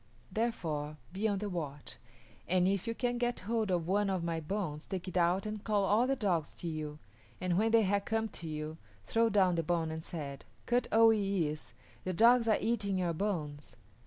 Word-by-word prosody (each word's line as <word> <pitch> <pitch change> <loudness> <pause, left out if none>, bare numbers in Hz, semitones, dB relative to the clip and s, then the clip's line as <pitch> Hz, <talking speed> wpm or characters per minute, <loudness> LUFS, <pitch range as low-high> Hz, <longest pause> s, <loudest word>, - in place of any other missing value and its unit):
Therefore, 160 -10 -2 0.2
be 205 +4 0
on 205 -2 0
the 210 +2 -3
watch, 150 -7 -5 0.5
and 180 0 +3
if 200 +2 0
you 230 - -1
can 245 0 -1
get 240 0 -1
hold 220 +1 -1
of 175 -3 0
one 200 +2 +2
of 185 -3 -1
my 165 -1 -1
bones 160 -2 -4
take 190 -2 -4
it 185 - -6
out 180 +2 +2
and 215 -1 -4
call 210 -2 +1
all 215 +5 +3
the 270 - +2
dogs 185 - -1
to 175 - -6
you, 155 -2 -4 0.4
and 180 -1 0
when 220 +4 +3
they 225 0 +5
have 200 0 +1
come 225 0 0
to 170 - -7
you 155 +1 -5 0.3
throw 230 0 +2
down 195 -4 +4
the 165 - +1
bone 165 0 0
and 160 0 -5
say, 140 -6 -6 0.3
'Kut 245 +1 +1
o 225 0 +7
yis´, 195 -8 0 0.3
the 185 - -2
dogs 230 +4 +5
are 220 - +4
eating 205 -4 0
your 175 -2 0
bones.'" 155 -6 -3
190 Hz, 205 wpm, -32 LUFS, 165-220 Hz, 0.5 s, o